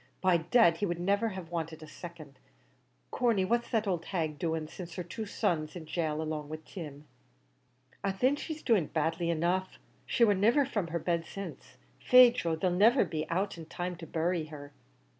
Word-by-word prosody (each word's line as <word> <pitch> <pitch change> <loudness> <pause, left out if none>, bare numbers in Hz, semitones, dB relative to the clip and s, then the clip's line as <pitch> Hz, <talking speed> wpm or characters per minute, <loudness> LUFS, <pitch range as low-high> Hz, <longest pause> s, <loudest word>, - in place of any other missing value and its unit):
By 185 -2 +4
dad, 170 +1 +4
he 205 - 0
would 175 -1 -2
niver 200 +5 +1
have 185 -4 -8
wanted 160 -2 -4
a - - -10
second. 155 -4 -11 0.7
Corney 230 -6 +2
what's 235 +4 0
the 220 -3 0
owld 175 -4 -1
hag 160 -6 -2
doing 160 -2 -1
since 170 +1 -9
her 180 - -3
two 215 +6 -6
sons 155 -5 0
is - - -18
in 170 -3 -7
gaol 155 -1 -1
along 155 -2 -4
with 155 0 -7
Tim?" 150 -5 -8 1.0
"Ah! 195 - +1
thin, 255 +9 +2
she's 310 +1 -6
doing 205 - +3
badly 165 +2 -1
enough; 175 +3 0 0.3
she 235 - +2
war 205 - +4
niver 230 +9 +3
from 210 -9 -2
her 170 +1 -2
bed 170 0 -1
since. 195 0 -8 0.2
Faix, 250 -1 +7
Joe, 165 -1 0
they'll 180 +3 0
niver 215 +7 +5
be 155 -2 -4
out 185 +1 -1
in 160 - -9
time 175 +2 -4
to 165 0 -9
bury 170 0 0
her." 145 -2 -10
175 Hz, 195 wpm, -31 LUFS, 160-200 Hz, 1.0 s, Faix